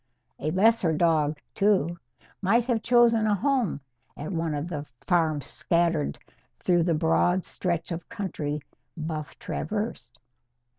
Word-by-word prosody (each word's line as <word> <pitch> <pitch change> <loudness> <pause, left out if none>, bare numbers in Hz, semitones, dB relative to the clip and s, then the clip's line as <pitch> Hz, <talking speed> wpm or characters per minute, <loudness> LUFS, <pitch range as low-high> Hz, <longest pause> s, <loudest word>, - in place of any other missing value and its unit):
A 155 - -1
lesser 190 -1 +3
dog, 155 -2 +2 0.2
too, 185 -5 +2 0.4
might 225 +5 +3
have 240 -3 0
chosen 230 -2 +4
a 210 - +3
home 245 - 0 0.4
at 150 - -5
one 165 -3 -1
of 145 +3 -3
the 150 -5 -4 0.2
farms 160 -6 +2
scattered 170 -1 0 0.4
through 175 -1 +2
the 165 -1 +2
broad 175 +3 +2
stretch 170 -1 -2
of 170 +5 -5
country 160 -9 -3 0.4
Buff 155 -2 -5
traversed. 205 - -4
175 Hz, 130 wpm, -27 LUFS, 155-210 Hz, 0.4 s, chosen